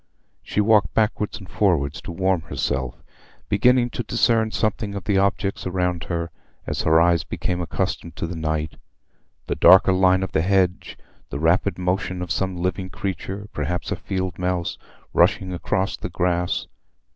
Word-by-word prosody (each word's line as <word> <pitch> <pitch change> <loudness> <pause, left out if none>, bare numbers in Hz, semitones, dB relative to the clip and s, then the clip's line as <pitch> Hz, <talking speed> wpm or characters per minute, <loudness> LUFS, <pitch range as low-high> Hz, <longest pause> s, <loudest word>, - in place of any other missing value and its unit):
She 105 - -1
walked 105 -1 +3
backwards 105 -1 0
and 95 -4 -11
forwards 80 -10 +1
to - - -7
warm 95 0 +1
herself, 65 -4 -3 0.5
beginning 120 +4 +3
to - - -3
discern 115 0 +2
something 110 -1 -1
of 100 - -5
the 100 +1 +2
objects 100 0 0
around 90 -2 -1
her, 85 -1 -3 0.3
as - - -2
her 80 +1 +4
eyes 85 -1 +3
became 90 0 -3
accustomed 85 0 -3
to - - -3
the 85 +1 -5
night—the 80 -5 -6
darker 95 0 +7
line 95 0 +4
of 95 - -4
the - - +1
hedge, 90 0 +1 0.3
the - - -4
rapid 85 +4 +2
motion 90 0 -1
of 90 - -6
some 95 +1 -1
living 90 +1 -2
creature—perhaps 95 -4 -4
a - - +1
field 95 -1 -4
mouse—rushing 90 +1 -1
across 95 +2 -1
the - - -6
grass. 90 0 0
90 Hz, 150 wpm, -23 LUFS, 85-100 Hz, 0.5 s, darker